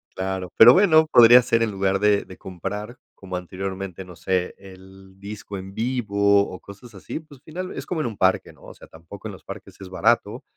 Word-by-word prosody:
Claro, 95 -1 -4
pero 120 +3 +9
bueno, 160 -5 +5
podría 120 -3 +7
ser 115 0 +1
en 115 - 0
lugar 95 0 -1
de 105 -1 +2
de 95 - -13
comprar 105 +6 -7 0.2
como 95 -2 -8
anteriormente, 95 +1 -6
no 90 -1 -13
sé, 90 +1 -2
el 95 0 -16
disco 100 0 -8
en 95 +1 -9
vivo 100 -4 +1
o 95 - -9
cosas 100 +4 -14
así, 95 - -7
pues, 145 -4 -17
final 180 +5 -7
es - - -6
como 170 -4 -2
en 130 - -2
un 110 -4 -7
parque, - - +1
¿no? - - -23
O - - -12
sea, - - -16
tampoco 85 +6 -12
en - - -7
los 95 - -13
parques - - -11
es 95 - -9
barato, 90 -2 0
100 Hz, 210 wpm, -22 LUFS, 95-115 Hz, 0.2 s, pero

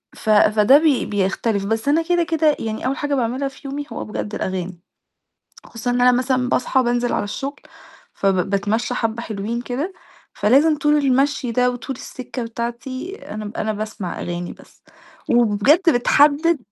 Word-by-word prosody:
ف 220 - -6
فده 215 +4 +6
بي 305 -5 +2
بيختلف، 200 +1 -1
بس 225 +5 -2
أنا 310 +3 +3
كده 350 +1 +1
كده 320 -2 +2
يعني 220 +1 -4
أول 270 +2 -1
حاجة 290 -1 -1
باعملها 255 +3 -1
في 275 +1 -10
يومي 285 +1 -4
هو - - -5
بجد 210 0 -5
الأغاني. 185 -2 -4 0.9
خصوصًا 235 +1 -4
إن 245 - 0
أنا 250 0 +6
مثلًا 255 0 +1
باصحى 260 +1 +1
بانزل 240 0 0
على - - 0
الشغل 275 +7 -5 0.5
فب 195 -2 0
باتمشى 210 +5 0
حبة 225 0 -2
حلوين 220 +2 -4
كده، 280 +10 -3 0.4
فلازم 290 +8 +4
طول 295 +1 +3
المشي 275 -2 +1
ده 250 +1 +2
وطول 250 +1 -6
السكة 255 -1 -7
بتاعتي 240 - -5 0.2
أنا 215 -1 -5
أنا 215 0 -1
باسمع 210 -3 -5
أغاني 175 0 -4
بس. - - -19 0.5
وبجد 240 - +4
بتحدد 290 +6 +4
245 Hz, 160 wpm, -21 LUFS, 215-280 Hz, 0.9 s, فده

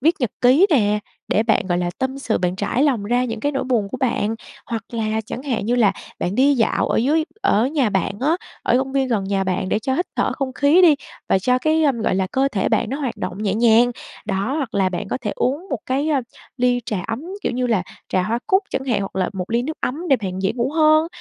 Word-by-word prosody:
viết 320 +6 +4
nhật 245 - 0
ký 270 +10 +6
nè, 210 -7 +3 0.3
để 215 - +2
bạn, 220 -4 +1
gọi 175 -1 0
là, 175 -1 -1
tâm 265 +1 -2
sự, 235 -5 -1
bạn 180 0 -1
trải 210 +7 0
lòng 260 -8 +2
ra 245 +3 +1
những 225 -2 -4
cái 290 0 0
nỗi 270 - -1
buồn 235 -6 0
của - - -5
bạn. 225 -4 0 0.3
Hoặc 230 -1 -3
là 220 -1 -1
chẳng 255 - -6
hạn 235 -7 -2
như 240 - +2
là 215 -5 +4 0.3
bạn 180 - -2
đi 275 +3 +4
dạo 230 -3 +1
ở - - +1
dưới 305 +7 +2 0.2
ở 220 +5 +3
nhà 275 -6 +1
bạn 190 -1 0
á, 310 +5 +2 0.3
ở 240 - +2
công 265 0 -2
viên 270 -1 +1
gần 210 -5 0
nhà 195 0 0
bạn 185 0 -1
để 210 - +1
cho 260 +4 -1
hít 355 - 0
thở - - +1
không 270 -2 -3
khí 295 +7 +4
đi 320 -4 +7 0.3
và - - +4
cho 250 +6 +2
cái, 315 +4 +2
ờm, 260 -7 +1
gọi - - +1
là, 190 0 +1
cơ 270 +1 +2
thể 195 -3 0
bạn 225 - +1
nó 275 - -3
hoạt 260 -5 -3
động 200 +4 -5
nhẹ 200 -1 0
nhàng. 235 +1 +5 0.4
Đó, 200 +6 -1
hoặc 270 -7 -3
là 195 -2 +2
bạn 190 +2 -4
có - - -2
thể 210 -3 -3
uống 295 +9 -1
một 265 - -1
cái, 275 +4 0
ơ, 285 -4 +2 0.4
ly 245 -1 +2
trà 205 -4 -2
ấm, 230 +6 -4 0.2
kiểu, - - -1
như 250 0 0
là 215 -6 +1 0.3
trà 185 - +1
hoa 225 +5 -1
cúc 380 +2 +3
chẳng 265 - -2
hạn 235 -6 0
hoặc 195 -1 -5
là 185 - 0
một 185 0 -5
ly 235 +1 +1
nước 310 +4 -4
ấm 325 +7 -3
để 270 - +5
bạn 190 -3 -5
dễ 195 - +1
ngủ 245 +2 -1
hơn. 310 0 +4
245 Hz, 265 wpm, -21 LUFS, 205-275 Hz, 0.4 s, đi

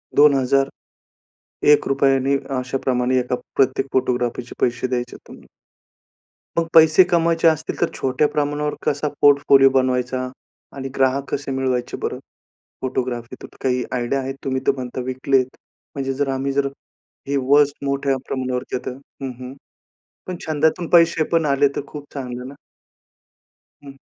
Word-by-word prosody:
2,001 140 +1 +1
रुपयाने 135 0 +2 0.2
अशाप्रमाणे 125 0 0
एका 125 0 -2 0.2
प्रत्येक 135 0 +2
फोटोग्राफीचे 125 -1 -1
पैसे 120 +1 +1
द्यायचे 125 -1 -3
आहेत - - -24
तुम्हाला. - - -14 1.1
मग 165 -1 +1
पैसे 160 +2 +7
कमवायचे 165 -1 +3
असतील 155 -1 0
तर 170 - +4
छोट्या 135 +3 +1
प्रमाणावर 150 0 -1
कसा 145 +1 0
पोर्टफोलिओ 140 -1 +6
बनवायचा? 130 -1 0 0.5
आणि 135 -1 -5
ग्राहक 135 +1 +1
कसे 140 -1 -3
मिळवायचे 130 -2 -1
बरं - - -2 0.7
फोटोग्राफीतून 125 -1 -4
काही 125 -1 +1
आयडिया 125 +2 -1
आहे? 135 0 -4
तुम्ही 130 -1 -1
तर - - +5
म्हणता 130 -1 -5
विकलेत. 130 0 +1 0.5
म्हणजे 135 -1 -2
जर 140 +1 -1
आम्ही 135 +1 -2
जर 140 0 +1 0.6
हे 140 - 0
वस्ट 145 0 +4
मोठ्या 140 0 0
प्रमाणावरतीं 130 -1 -2
आता - - -6
हं, 135 +1 -9
हं. 125 0 -7 0.7
पण 185 - -4
छंदातून 160 +2 +1
पैसे 165 -2 +5
पण 165 -2 +3
आले 140 0 +3
तर - - 0
खूप 150 -1 -8
चांगलं 125 -2 -5
ना. 140 - -10 1.3
हं. 140 -1 -12
135 Hz, 135 wpm, -21 LUFS, 130-145 Hz, 1.3 s, पैसे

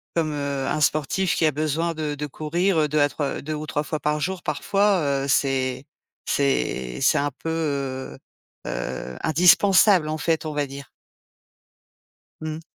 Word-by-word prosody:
comme, 160 -2 +1
heu, 140 -2 -2
un 155 - 0
sportif 155 +5 +1
qui 160 - +3
a 155 - +2
besoin 155 +3 -1
de 155 -2 -2
de 150 +1 -4
courir, 160 +2 0
2 150 +1 0
à 145 0 +4
3 145 -1 -3
2 155 +2 -4
ou 150 +1 -5
3 150 0 -2
fois 155 0 -3
par 150 0 0
jour 185 +3 -3
parfois, 180 -9 +1
heu, - - -4
c'est 135 -1 0 0.4
c'est 65 - -1
c'est - - +4
un 145 0 0
peu, 165 - -4
heu, 140 -5 -3 0.5
heu, 65 0 -4
indispensable 180 +2 +5
en 155 0 -3
fait, 160 0 0
on 155 - -3
va 145 -1 -1
dire. 140 0 -9 1.5
Mmh. 155 0 -5
150 Hz, 165 wpm, -24 LUFS, 140-160 Hz, 1.5 s, indispensable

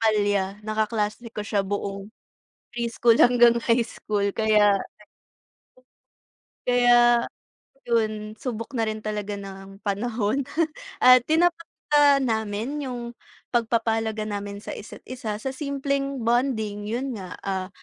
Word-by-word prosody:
palya 205 -3 +1
na 215 - -3
kaklase 215 +1 -1
ko 210 -2 -6
siya 210 -1 0
buong 195 0 -4 0.7
preschool 235 0 +2
hanggang 240 -1 +6
high 235 0 +3
school 205 -3 -3
kaya 210 -2 +4 1.9
Kaya, 240 -1 +5 0.7
yun 215 -2 0
subok 230 +1 -5
na 230 - 0
rin 215 0 -3
talaga 210 -1 -3
ng 195 0 -10
panahon, 220 +4 0 0.6
at 255 -1 +8
tinatapatan 310 -4 +2
namin 220 +5 -2
yung 250 -2 -4 0.5
pagpapahalaga 225 -2 0
namin 205 -1 -5
sa - - -6
isa't 210 - -10
isa 235 -5 -5
sa 265 +5 -4
simpleng 275 -1 -2
bonding, 230 -4 0
yun 245 +4 -3
nga, 185 -2 -8
ah, 190 -1 -2
225 Hz, 115 wpm, -25 LUFS, 210-245 Hz, 1.9 s, at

